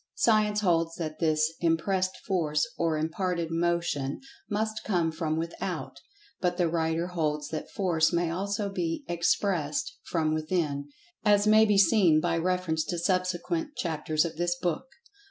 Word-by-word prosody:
Science 215 -2 +3
holds 165 -3 +1
that 155 -2 -5
this 155 -1 +2
"impressed 185 +3 +1
Force" 155 -6 +1
or 165 -2 0
"imparted 170 +1 -2
Motion" 165 -5 0 0.3
must 215 +1 -2
come 175 -5 +1
from 160 -1 -2
without, 165 +1 -4 0.4
but 180 -1 0
the 175 -2 +2
writer 165 +1 0
holds 150 -4 -1
that 160 - -5
Force 170 -5 +1
may 170 -1 +1
also 200 +3 -2
be 175 -4 -3
"expressed" 170 -2 0
from 155 -2 0
"within," 155 -3 -1 0.3
as 205 -1 +4
may 215 +1 +6
be 210 -2 +3
seen 185 -4 +5
by 155 - 0
reference 170 -2 0
to 175 - -3
subsequent 185 - -1
chapters 155 -1 0
of 160 - -5
this 175 +1 0
book. 175 +7 -2
170 Hz, 145 wpm, -28 LUFS, 160-185 Hz, 0.4 s, may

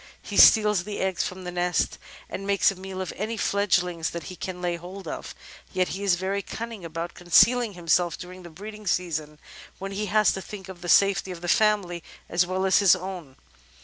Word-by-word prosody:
He - - -7
steals 210 -4 +7
the 205 +1 -6
eggs 190 -2 0
from 185 0 -6
the 180 - -5
nest, 175 -2 0 0.3
and 195 - -6
makes 200 +1 +3
a - - -8
meal 190 0 -7
of 185 - -4
any 220 +3 -3
fledgings 180 -5 +1
that 170 -1 -6
he - - -9
can 180 0 -6
lay 175 -1 -1
hold 180 +2 -9
of. - - -6 0.4
Yet 185 -1 +1
he 195 +2 -5
is 195 -3 +3
very 190 +2 -2
cunning 225 -1 -7
about 165 +1 -5
concealing 210 +6 +4
himself 175 -1 +1
during 185 +1 -10
the 175 - -11
breeding 210 +5 -10
season, 160 -4 -1 0.4
when 195 0 -6
he 210 +2 -3
has 210 +2 +4
to 190 - -4
think 195 -1 -9
of 180 -2 -10
the 175 - -5
safety 195 0 +4
of 175 -2 -7
the 175 - -5
family 185 -3 +2 0.3
as 175 +1 +2
well 185 +1 -1
as 190 - +4
his 200 -3 +6
own. 180 -8 -7
185 Hz, 210 wpm, -25 LUFS, 175-200 Hz, 0.4 s, steals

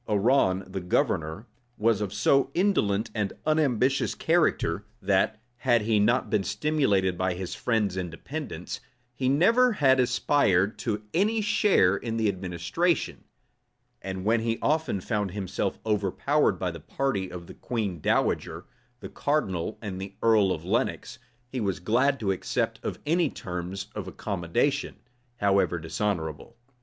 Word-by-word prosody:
Arran, 100 -3 +3
the 95 0 -5
governor, 85 +2 0 0.3
was 110 -1 +2
of 100 -3 -2
so 135 +6 +3
indolent 115 - +1
and 105 -3 -1
unambitious 135 -4 +2
a - - -26
character, 155 - +1 0.2
that, 100 +1 +1 0.2
had 120 -3 +2
he 110 -1 +2
not 120 +5 +2
been 105 -2 +1
stimulated 105 - +1
by 95 0 -1
his 95 0 -5
friends 110 -6 0
and 90 -2 -3
dependants, 145 - -6 0.3
he 130 +1 0
never 230 - +4
had 135 -8 +4
aspired 125 -6 +2
to 105 -3 -2
any 215 +5 +2
share 200 - +3
in 115 +2 -3
the 110 -1 +1
administration; 95 - -1 0.8
and 95 0 -5
when 115 +2 +3
he 115 0 0
found 105 - 0
himself 95 -1 -3
overpowered 105 +6 +1
by 90 0 -2
the 85 - -9
party 100 - -2
of 90 -1 -8
the - - -11
queen 105 -8 -3
dowager, - - 0 0.4
the - - -6
cardinal, 105 - -1
and 95 -3 -5
the 95 0 -7
earl 110 -4 +4
of - - -3
Lenox, - - -1 0.3
he 125 +1 -4
was 95 -3 -1
glad 130 +9 +2
to 100 -3 0
accept 95 - -2
of - - -4
any 165 0 +2
terms 90 0 -5
of 105 -3 -5
accommodation, 100 - -1 0.4
however 100 -4 +2
dishonorable. 80 +3 -3
105 Hz, 145 wpm, -27 LUFS, 95-135 Hz, 0.8 s, never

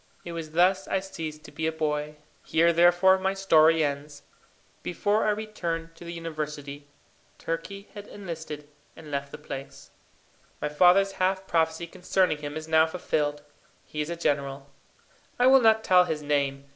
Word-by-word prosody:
It 170 - -6
was 165 -2 -6
thus 185 +3 +3
I 195 - 0
ceased 160 -5 -7
to - - -12
be 160 - -2
a - - +1
boy. 150 -1 -2 0.3
Here, 170 +1 +3
therefore, 175 +3 +5
my 190 +1 0
story 165 -4 +4
ends. 145 0 -4 0.6
Before 205 +5 0
I - - +4
returned 175 -6 -3
to 175 - -13
the 170 - -7
university, 150 -3 -6 0.5
Turkey 195 +5 -5
had 205 -1 -9
enlisted 160 -6 -7 0.3
and 155 -2 -12
left 140 0 -3
the - - -7
place. 140 -2 -9 0.7
My 150 - -2
father's 180 +6 +5
half 190 +1 +1
prophecy 160 -1 0
concerning 180 -2 0
him 145 +1 -5
is 155 0 -7
now 160 0 +4
fulfilled. 150 -3 -2 0.4
He 150 - -4
is 150 - -3
a 170 - -3
general. 140 -3 -2 0.7
I 245 - +3
will 265 0 +7
not 220 -1 +4
tell 180 -3 +5
his 155 -3 -3
name. 140 -2 0
165 Hz, 165 wpm, -27 LUFS, 150-185 Hz, 0.7 s, will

